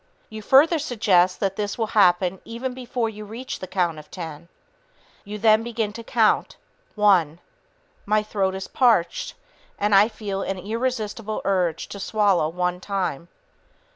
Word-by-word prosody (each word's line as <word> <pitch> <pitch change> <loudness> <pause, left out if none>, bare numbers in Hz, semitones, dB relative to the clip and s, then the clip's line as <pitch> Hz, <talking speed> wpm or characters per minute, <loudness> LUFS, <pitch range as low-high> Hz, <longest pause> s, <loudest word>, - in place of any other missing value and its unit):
You 220 0 -7
further 295 +9 +5
suggest 200 - +2
that 195 -1 -1
this 205 -1 -3
will 225 - 0
happen 180 -2 +3
even 245 +3 -5
before 250 -2 -3
you 215 -1 -7
reach 230 +5 -7
the 185 - -7
count 175 -4 -1
of 150 - -14
10. 165 -2 -8 0.8
You 210 +1 -6
then 215 +1 +4
begin 225 -2 -3
the 230 +2 -9
count. 225 -2 +1 0.4
"One... 185 -7 +3 0.7
My 215 +1 +2
throat 195 -3 -1
is 190 - -6
parched, 225 -10 +1 0.4
and 205 0 0
I 200 +2 +7
feel 205 -3 -5
an 195 - -3
irresistible 220 +1 -3
urge 180 -4 0
to 200 - -8
swallow 195 -6 +1
one 180 +1 -2
time. 185 -6 -3
205 Hz, 150 wpm, -23 LUFS, 185-225 Hz, 0.8 s, I